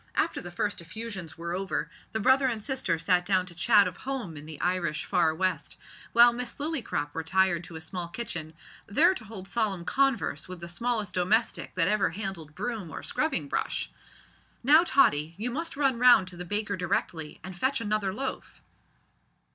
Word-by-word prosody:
After - - 0
the 175 - -7
first 190 +2 -2
effusions 190 -1 -7
were 170 +1 -4
over, 190 +1 -2 0.2
the 220 - -2
brother 260 +5 +4
and 225 -4 -2
sister 260 - -1
sat 180 +2 +2
down 185 0 +2
to 180 - -11
chat 205 +4 +5
of - - -6
home 260 -11 -4
in 145 +1 -9
the 155 - -8
Irish 175 -4 0
far 175 -4 +3
west, 185 +2 -1 0.3
while 240 0 +7
Miss 245 0 -4
Lillycrop 265 - -2
retired 170 +2 +1
to 165 - -11
a 160 - -6
small 175 0 -5
kitchen, 170 -5 -5 0.3
there 320 - +5
to 300 - -8
hold 200 -3 -9
solemn 200 -7 -1
converse 270 -4 +1
with 185 -1 -8
the 170 - -6
smallest 215 0 -1
domestic 205 +6 +1
that 175 -2 +3
ever 205 -2 +2
handled 170 -5 -5
broom 220 -8 -4
or - - -7
scrubbing 240 - -1
brush. - - -2 0.7
"Now, 300 +6 +7
Tottie, 165 - +3
you 235 +4 -2
must 330 +3 -4
run 270 -4 +2
round 245 -6 +7
to 180 - -10
the 180 +1 -6
baker 205 +2 -1
directly, 165 -3 -2
and 185 0 -7
fetch 260 +9 +1
another 210 -3 0
loaf." 265 +7 -5
195 Hz, 180 wpm, -28 LUFS, 175-235 Hz, 0.7 s, while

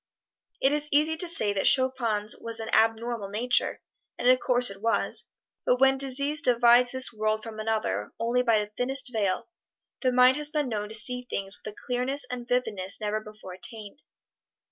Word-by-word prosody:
It 270 +2 +2
is 295 0 0
easy 305 +2 +2
to 355 - 0
say 215 -11 +3
that 195 - 0
Chopin's 235 -5 +1
was 230 -1 -2
an 225 - -5
abnormal 225 -1 +1
nature, 240 +4 -1 0.3
and - - -1
of 255 0 +5
course 245 -3 +3
it 195 0 -12
was, 230 +1 0 0.4
but 250 - +1
when 270 0 +4
disease 280 +3 0
divides 245 -1 +4
this 260 -1 -1
world 215 0 -1
from 220 -1 -8
another 215 - -2
only 235 +2 +1
by 230 -3 +2
the 210 0 -3
thinnest 260 +1 -1
veil, 200 -4 -1 0.5
the 255 - +1
mind 250 +2 +5
has 300 0 0
been 300 -4 -2
known 210 -2 -4
to 220 - +2
see 250 +3 +4
things 195 0 -4
with 215 - -9
a - - -23
clearness 255 +3 0
and 245 -1 -6
vividness 210 -6 -1
never 210 0 -2
before 215 -3 -12
attained. 215 +6 -10
235 Hz, 185 wpm, -26 LUFS, 215-260 Hz, 0.5 s, of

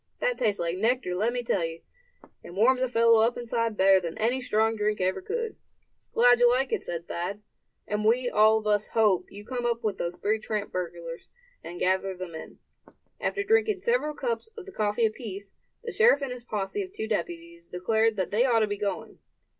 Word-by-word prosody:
That - - +1
tastes 205 -2 +1
like 170 +2 -2
nectar, 230 -3 +1
let 215 +6 +1
me 245 0 -3
tell 195 -6 0
you: 165 0 -5 0.6
and 175 - -11
warms 255 +4 +4
a 260 - +2
fellow 230 -2 +4
up 230 +2 +2
inside 230 -2 -2
better 190 0 +6
than 170 -2 -6
any 245 +4 +1
strong 220 -2 +1
drink 210 0 0
could - - -2
ever 185 - -1
do." 455 +3 -3 0.6
"Glad 245 +1 +6
you 245 0 +6
like 255 +2 +1
it," - - 0
said 170 0 -5
Thad; 195 +5 -4 0.4
"and 210 0 -2
we 240 +3 +3
all 215 -1 +5
of 215 - -5
us 210 0 +2
hope 210 -5 +2
you 205 +1 -10
come 245 0 -4
up 235 0 -1
with 210 -3 -2
those 175 +1 -3
three 215 +2 0
tramp 215 -1 -3
burglars, 170 -2 -6 0.3
and 175 +1 -8
gather 190 0 0
them 185 -2 -7
in." 160 - -9 0.6
After 400 - -1
drinking 430 -2 +2
several 470 -10 0
cups 240 - -3
of 430 - -8
the 395 - -10
coffee 215 - 0
apiece, 205 -3 -5 0.3
the 465 - -4
sheriff 450 -13 +4
and 270 - -3
his 250 -1 -7
posse 210 - -3
of 375 -1 -6
two 220 - -5
deputies 170 -4 -4
declared 220 +5 +1
that 190 -3 -2
they 220 +4 +3
ought 235 -3 +3
to 215 - +2
be 205 -1 -4
going. 205 -1 -4
220 Hz, 210 wpm, -27 LUFS, 190-245 Hz, 0.6 s, better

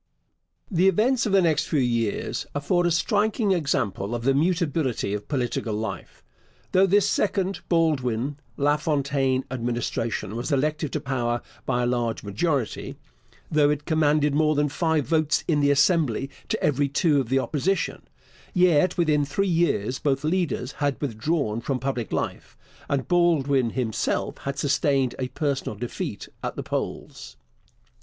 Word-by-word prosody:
The 180 +1 +3
events 230 +5 +2
of - - -1
the 195 -1 +5
next 155 -3 +2
few 150 - +1
years 115 -4 -1
afford 175 +5 +1
a - - +1
striking 205 +4 +1
example 120 - 0
of 115 - -4
the 135 +2 +3
mutability 155 - 0
of 105 0 -4
political 120 -5 -2
life. 105 -4 -6 0.5
Though 190 +1 +5
this 200 +2 +4
second 195 -1 0
Baldwin 140 -6 +1 0.2
LaFontaine 140 -3 +1
Administration 115 -3 -2
was 120 +6 -3
elected 150 +2 0
to 150 - 0
power 120 -4 -2 0.2
by 125 -1 +1
a - - +2
large 120 -2 -1
majority 120 - -2 0.5
though 150 -2 +4
it 150 0 -1
commanded 150 -2 +2
more 155 +1 +3
than 145 0 +2
five 160 -1 0
votes 155 -2 +1
in 155 -3 +2
the 145 0 +3
Assembly 145 - +2 0.2
to - - -2
every 145 -1 +2
two 145 0 +2
of 120 - -6
the 135 - +2
Opposition 165 +7 -1 0.5
yet 180 -1 +4
within 155 -4 +3
three 195 +8 -1
years 150 - +1
both 135 -2 0
leaders 155 -6 -1
had 145 -2 -2
withdrawn 120 -2 -1
from 135 +2 -1
public 125 -4 -3
life, - - -4 0.3
and 140 -2 -1
Baldwin 145 -8 +3
himself 115 -2 -2
had 140 0 -4
sustained 140 -2 +1
a 130 - -1
personal 135 -3 -2
defeat 120 +3 -5
at - - -4
the - - -4
polls. - - -5
145 Hz, 150 wpm, -25 LUFS, 125-165 Hz, 0.5 s, the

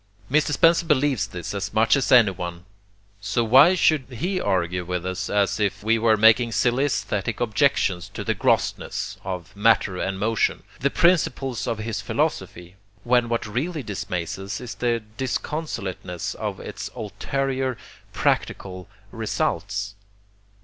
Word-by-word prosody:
Mr. 150 +1 +3
Spencer 165 +3 +4
believes 145 - +2
this 85 +2 -6
as 100 +1 -4
much 110 +4 +4
as 140 - 0
anyone; 90 -7 +3 0.5
so 115 +4 0
why 135 +11 +6
should 155 -6 +3
he 180 - -2
argue 90 -1 0
with 90 0 -3
us 95 -1 -3
as 100 +1 +1
if 100 -1 -1
we 115 +1 +2
were 110 -1 +3
making 115 +2 +5
silly 125 +5 +2
aesthetic 105 -4 -2
objections 110 -6 +1
to 105 - -4
the 110 - 0
'grossness' 100 - -1
of 90 -2 -6
'matter 105 -3 +2
and 95 0 -2
motion,' 110 +2 0 0.2
the 140 - +1
principles 140 -7 +1
of 115 - -1
his 110 -1 -4
philosophy, 95 - -3 0.3
when 120 -1 +2
what 115 0 -1
really 140 +8 -3
dismays 90 -5 -4
us 95 +1 -5
is 125 -2 -7
the 120 -2 -1
disconsolateness 110 - -4
of - - -5
its - - -6
ulterior 135 -2 -2 0.3
practical 90 -2 -2 0.2
results? 100 0 -2
110 Hz, 140 wpm, -24 LUFS, 95-130 Hz, 0.5 s, why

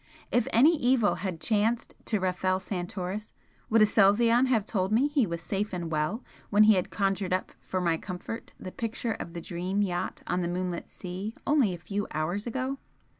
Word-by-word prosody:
If 240 -2 +2
any 290 +9 +6
evil 245 -4 +3
had 185 -4 -3
chanced 220 +4 0
to 215 - 0
Rafel 185 0 0
Santoris, 185 +2 -4 0.4
would 225 -1 +6
Aselzion 230 +4 +5
have 225 -6 +2
told 190 -3 -1
me 240 +6 +4
he 285 -6 +2
was 170 -1 -4
'safe 200 +3 -2
and 170 -2 -3
well' 155 +10 -1 0.3
when 210 +1 +6
he 215 0 +7
had 185 -2 0
conjured 195 -2 0
up 185 - -1
for 185 - -3
my 170 -2 +1
comfort 185 +6 -7
the 185 - -7
picture 230 +1 -3
of 170 - -7
the 170 - -5
'Dream' 180 +4 -1
yacht 180 -3 -3
on 180 +1 0
the 170 - -1
moonlit 180 0 -3
sea 190 +4 -6
only 280 -9 +3
a 175 - -4
few 200 +4 -3
hours 175 +8 -2
ago? 265 +3 -2
200 Hz, 185 wpm, -28 LUFS, 180-225 Hz, 0.4 s, he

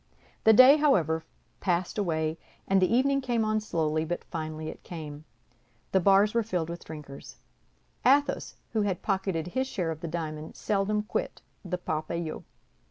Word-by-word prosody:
The 220 - +8
day, 255 +6 +9
however, 165 - +2 0.4
passed 180 +2 -1
away; 160 -4 -1 0.3
and 195 0 +3
the 185 - +3
evening 275 +3 +3
came 240 -4 0
on 215 0 +1
slowly, 155 -6 -1
but 175 +2 -3
finally 155 -1 -5
it - - -7
came. 155 -3 -8 0.7
The 190 - +4
bars 195 +3 +4
were 235 - +3
filled 180 -7 -2
with 170 - -7
drinkers. 150 -3 -9 0.7
Athos, 285 +2 +2 0.2
who 220 - +2
had 195 -3 -1
pocketed 190 -4 -1
his 260 +7 -1
share 180 -10 -2
of 160 0 -7
the 170 - -4
diamond, 155 -2 -5
seldom 210 +1 0
quit 470 - -3 0.2
the 180 -1 -3
Parpaillot. 160 -1 -3
180 Hz, 160 wpm, -28 LUFS, 160-215 Hz, 0.7 s, day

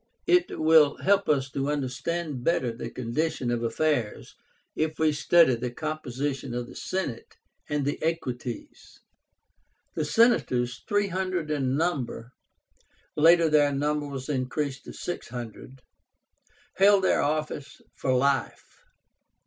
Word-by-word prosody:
It 360 0 +2
will 155 -2 +5
help 200 0 +3
us 135 -3 +1
to 135 +1 -2
understand 145 +1 -3
better 165 -7 +1
the 115 - -6
condition 130 +1 -2
of 120 -1 -1
affairs, 120 -1 -1 0.4
if 155 0 -1
we 160 -1 +3
study 150 -1 +4
the 120 +1 -3
composition 140 -2 -4
of 120 0 -3
the - - -13
Senate 145 -12 -4 0.3
and 150 -2 -1
the 145 - -2
Equites. 125 -7 -5 0.9
The - - -1
Senators, 130 - +2
three 205 -1 +1
hundred 185 -4 -2
in 135 -2 0
number 135 -8 -2 0.8
(later 165 +2 +6
their 150 -2 +4
number 145 +1 -1
was 135 -2 -6
increased 135 0 -2
to - - -9
six 175 - -5
hundred), 120 +2 -9 1.0
held 195 0 +5
their - - +3
office 150 -1 -3
for 130 - -2
life. 135 0 0
145 Hz, 125 wpm, -27 LUFS, 130-160 Hz, 1.0 s, later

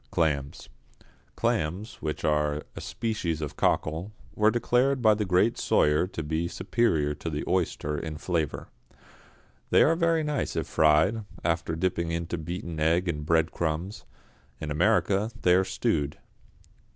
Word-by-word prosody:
=Clams.= 70 -4 -1 0.7
Clams, 90 +8 -2
which 75 -1 -3
are 75 -1 +1
a - - -6
species 105 -9 -2
of 75 -2 -5
cockle, 80 +7 0 0.2
were 105 0 +4
declared 125 +3 +2
by 110 -3 +5
the 105 0 -1
great 90 +5 +2
Soyer 75 +4 +3
to 85 -3 -5
be 80 +3 -1
superior 85 -6 0
to 80 - -5
the 75 -1 -3
oyster 75 -5 -1
in 80 -2 -5
flavour. 80 -2 -2 1.0
They - - +6
are 165 - +4
very 165 -1 +2
nice 150 -1 -2
if - - -1
fried, 80 +9 +3 0.2
after 85 -1 0
dipping 85 -1 -1
into 85 0 -3
beaten 85 0 -5
egg 85 +4 +2
and 75 -3 -2
breadcrumbs. 80 +3 -1 0.5
In 75 - -5
America 100 +5 +2
they 90 - +5
are 95 +1 +4
stewed. 75 -5 -1
85 Hz, 140 wpm, -27 LUFS, 75-105 Hz, 1.0 s, They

